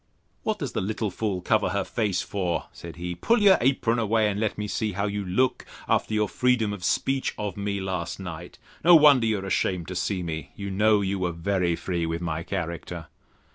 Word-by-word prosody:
What -, -, -1 dB
does -, -, -4 dB
the -, -, -2 dB
little 105 Hz, +1 st, -2 dB
fool 100 Hz, -1 st, -2 dB
cover 105 Hz, +1 st, +2 dB
her 100 Hz, +2 st, 0 dB
face 105 Hz, -6 st, -1 dB
for? 90 Hz, -4 st, -2 dB
said 85 Hz, -1 st, -10 dB
he: 90 Hz, +1 st, -4 dB
Pull 230 Hz, -, +2 dB
your 200 Hz, -2 st, +6 dB
apron 120 Hz, -2 st, +2 dB
away; 110 Hz, -1 st, +2 dB
and 100 Hz, -, -3 dB
let 110 Hz, -1 st, -1 dB
me 105 Hz, -, -2 dB
see 105 Hz, +1 st, -2 dB
how 100 Hz, +2 st, -1 dB
you 100 Hz, 0 st, -2 dB
look, 115 Hz, +8 st, +1 dB, 0.2 s
after 110 Hz, -, +1 dB
your 105 Hz, 0 st, +2 dB
freedom 120 Hz, -2 st, +1 dB
of 100 Hz, -3 st, -8 dB
speech 135 Hz, +7 st, 0 dB
of 105 Hz, -3 st, -3 dB
me 100 Hz, 0 st, -2 dB
last 95 Hz, -3 st, -3 dB
night. 85 Hz, -2 st, -8 dB, 0.3 s
No 175 Hz, +2 st, +8 dB
wonder 145 Hz, -7 st, +7 dB
you 110 Hz, -1 st, +1 dB
are 95 Hz, -, -5 dB
ashamed 90 Hz, -2 st, 0 dB
to 90 Hz, -, -5 dB
see 90 Hz, +1 st, -1 dB
me. 80 Hz, -3 st, -5 dB
You 100 Hz, -1 st, -5 dB
know 105 Hz, +2 st, +3 dB
you 100 Hz, 0 st, -1 dB
were 90 Hz, -1 st, 0 dB
very 85 Hz, 0 st, 0 dB
free 85 Hz, -1 st, -2 dB
with 80 Hz, 0 st, -2 dB
my 85 Hz, -2 st, -3 dB
character. 85 Hz, -2 st, -5 dB
100 Hz, 215 wpm, -26 LUFS, 90-110 Hz, 0.3 s, No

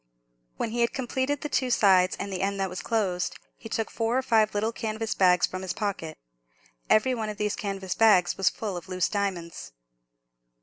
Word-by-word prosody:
When 225 Hz, -, -2 dB
he 240 Hz, +1 st, -1 dB
had 235 Hz, -, +2 dB
completed 260 Hz, +2 st, -2 dB
the 295 Hz, -, -3 dB
two 260 Hz, -3 st, 0 dB
sides 190 Hz, -6 st, +4 dB
and 200 Hz, -1 st, -4 dB
the 185 Hz, -, -3 dB
end 200 Hz, 0 st, -1 dB
that 190 Hz, -1 st, -1 dB
was 180 Hz, -, -5 dB
closed, 195 Hz, -6 st, -1 dB, 0.2 s
he 225 Hz, -, -11 dB
took 225 Hz, 0 st, -2 dB
four 230 Hz, +2 st, 0 dB
or 265 Hz, -, 0 dB
five 220 Hz, -4 st, +2 dB
little 215 Hz, +2 st, 0 dB
canvas 220 Hz, -1 st, -3 dB
bags 180 Hz, -2 st, +4 dB
from 185 Hz, -, -6 dB
his 190 Hz, -1 st, -3 dB
pocket. 195 Hz, -7 st, -4 dB, 0.7 s
Every 235 Hz, +4 st, +4 dB
one 220 Hz, -3 st, -3 dB
of 210 Hz, -, -6 dB
these 210 Hz, -1 st, -1 dB
canvas 195 Hz, -2 st, -3 dB
bags 195 Hz, -6 st, +4 dB
was 195 Hz, -, +3 dB
full 210 Hz, -4 st, -5 dB
of 175 Hz, -, -10 dB
loose 185 Hz, -1 st, 0 dB
diamonds. 180 Hz, -, -3 dB
205 Hz, 200 wpm, -27 LUFS, 185-225 Hz, 0.7 s, sides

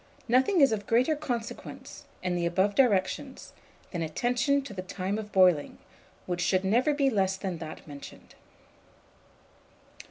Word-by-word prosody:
Nothing 260 Hz, -, +3 dB
is 275 Hz, -, +6 dB
of 205 Hz, -2 st, -3 dB
greater 255 Hz, +7 st, +3 dB
consequence, 240 Hz, -6 st, -6 dB, 0.2 s
in 180 Hz, -1 st, -1 dB
the 170 Hz, -1 st, 0 dB
above 190 Hz, +4 st, +1 dB
directions, 245 Hz, +3 st, 0 dB, 0.4 s
than 175 Hz, -, -3 dB
attention 245 Hz, -, 0 dB
to 240 Hz, -, -8 dB
the 185 Hz, -, -5 dB
time 190 Hz, +2 st, -3 dB
of 210 Hz, -1 st, -8 dB
boiling, 180 Hz, -6 st, +3 dB, 0.5 s
which 180 Hz, -1 st, -3 dB
should 185 Hz, +1 st, +1 dB
never 245 Hz, +9 st, +3 dB
be 280 Hz, -2 st, +2 dB
less 190 Hz, -3 st, +1 dB
than 190 Hz, -3 st, -4 dB
that 160 Hz, -1 st, -9 dB
mentioned. 145 Hz, -1 st, -11 dB
200 Hz, 140 wpm, -28 LUFS, 185-250 Hz, 0.5 s, is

